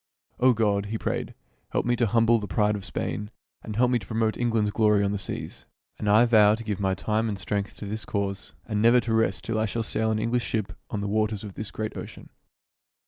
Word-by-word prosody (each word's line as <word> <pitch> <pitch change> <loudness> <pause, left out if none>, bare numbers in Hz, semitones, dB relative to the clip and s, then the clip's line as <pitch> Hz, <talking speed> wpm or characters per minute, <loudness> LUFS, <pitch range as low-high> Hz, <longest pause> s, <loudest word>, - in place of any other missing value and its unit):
"O 125 0 +5
God," 105 -3 +1
he 110 +2 -2
prayed, - - -3 0.4
"help - - +1
me 120 0 +2
to 120 -1 +2
humble 115 +1 +4
the 105 - -5
pride 105 +3 +1
of 100 - -5
Spain, 105 +2 -4 0.3
and 105 - -6
help 125 +2 +3
me 125 - +3
to 95 - -12
promote 110 0 0
England's 115 -3 +1
glory 105 -2 +3
on 100 - +1
the 100 - -2
seas. 95 - -6 0.3
And 105 - -1
I 110 +4 +6
vow 110 -3 +6
to 115 - -8
give 105 -3 -3
my 95 -1 +1
time 110 +3 0
and 100 - -3
strength 100 +1 -3
to - - -8
this 110 +2 -4
cause, 100 -1 -3
and 105 -2 -1
never 120 +2 +6
to 115 -1 -2
rest 95 -6 +1
till 115 0 -1
I 110 - +1
shall 115 +3 -2
sail 110 0 -1
an 110 - +1
English 115 +2 0
ship 105 -5 -2 0.2
on 105 - -3
the 100 - -2
waters 110 0 0
of 105 -2 -7
this 105 +1 -5
great 110 0 -4
ocean." - - -9
110 Hz, 240 wpm, -26 LUFS, 100-115 Hz, 0.4 s, I